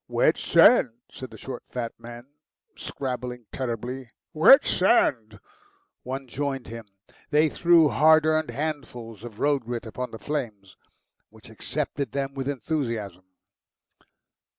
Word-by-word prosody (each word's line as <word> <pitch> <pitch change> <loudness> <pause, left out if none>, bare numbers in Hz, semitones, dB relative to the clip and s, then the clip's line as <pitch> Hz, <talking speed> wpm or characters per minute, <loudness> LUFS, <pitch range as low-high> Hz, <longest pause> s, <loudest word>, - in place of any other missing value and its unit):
"Wet - - +2
sand," 240 - +5 0.2
said 130 - -9
the - - -13
short, 130 -2 -7
fat 120 -2 -4
man, 120 +1 -10 0.5
scrabbling 125 -2 -6
terribly 125 0 -5 0.2
"wet 165 - +7
sand." 115 - +1 0.6
One 135 +2 -5
joined 135 0 -4
him. 115 -1 -9 0.4
They 155 +1 +3
threw 170 0 +4
hard 155 +2 +5
earned 155 -1 +1
handfuls 125 -7 -5
of 115 -3 -10
road 145 -1 +1
grit 120 0 -5
upon 125 +3 -5
the 115 - -9
flames, 110 -8 -5 0.5
which - - -16
accepted 140 -6 -4
them 140 -1 -3
with 135 -1 -5
enthusiasm. 115 - -4
130 Hz, 125 wpm, -25 LUFS, 115-145 Hz, 0.6 s, wet